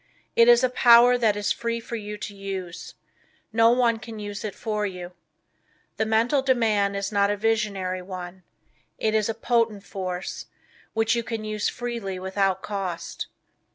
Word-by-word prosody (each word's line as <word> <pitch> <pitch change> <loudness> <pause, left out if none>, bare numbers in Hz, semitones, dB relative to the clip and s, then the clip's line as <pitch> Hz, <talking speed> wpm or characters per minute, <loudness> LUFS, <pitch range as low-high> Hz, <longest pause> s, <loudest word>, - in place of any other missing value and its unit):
It 230 - +6
is 240 +1 +7
a 255 - +4
power 245 0 +7
that 225 -4 +2
is 205 - 0
free 235 0 -2
for 230 +1 -6
you 210 -1 -5
to 205 - -6
use. 190 -3 -6 0.6
No 225 0 +5
one 235 -2 +3
can 225 -1 -9
use 205 -1 -6
it 210 -2 -4
for 215 -2 -2
you. 180 -3 -5 0.9
The 220 - 0
Mental 230 +6 +2
Demand 220 -6 +2
is 200 +1 -2
not 200 -1 +3
a 205 - 0
visionary 200 -4 0
one. 180 0 -8 0.6
It 215 - 0
is 215 0 +1
a 225 - -1
potent 230 -3 +1
force, 185 -2 -5 0.5
which 225 +1 +2
you 235 - 0
can 225 -1 -5
use 215 0 -1
freely 235 -6 -4
without 190 0 0
cost. 190 -4 -4
215 Hz, 165 wpm, -25 LUFS, 195-230 Hz, 0.9 s, is